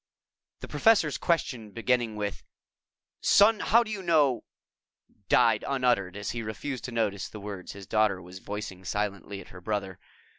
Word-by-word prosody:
The - - -6
Professor's 205 - +3
question 120 - -1
beginning 120 -1 0
with, 105 -1 -3 0.8
"Son, 210 +2 +5
how 235 +2 +4
do 220 - -7
you 205 -2 -3
know 155 -8 +3 0.4
" - - -39
died - - +4
unuttered 125 -9 +1
and 105 0 -7
he 115 - -2
refused 115 +4 -5
to 125 - -5
notice 105 -4 -1
the 105 - -9
words 100 -3 -7
his 100 -1 -10
daughter 105 -2 +2
was 90 +1 -11
voicing 100 -2 -6
silently 100 0 -3
at - - -14
her 90 - -12
brother. 100 -2 -3
110 Hz, 160 wpm, -28 LUFS, 100-135 Hz, 0.8 s, Son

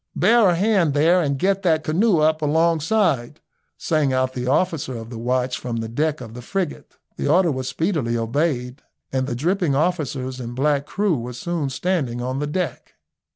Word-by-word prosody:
"Bear 220 +1 +5
a 175 - +2
hand 185 -6 +2
there 170 +5 +4
and 140 -4 0
get 195 +5 +1
that 160 -4 +2
canoe 180 +5 +2
up 155 0 +2
alongside," 160 - +1 0.4
sang 155 -5 +1
out 130 0 0
the 125 -1 -4
officer 140 -3 0
of 115 +1 -9
the 115 - -6
watch 125 +1 -1
from 120 -2 -4
the 115 -1 -3
deck 150 +5 -1
of 115 -3 -9
the 125 - -8
frigate. 180 +4 -4 0.2
The - - -2
order 170 +3 +4
was 130 -2 -3
speedily 155 - -1
obeyed, 125 +2 -1 0.3
and 130 0 0
the 120 - -2
dripping 170 - 0
officers 140 -5 -1
and 120 -1 -6
black 140 +1 +1
crew 195 -8 0
were 120 +2 -6
soon 155 +2 -3
standing 135 -4 -1
on 130 +2 -3
the 150 - -2
deck. 155 -3 -4
145 Hz, 185 wpm, -22 LUFS, 125-170 Hz, 0.4 s, Bear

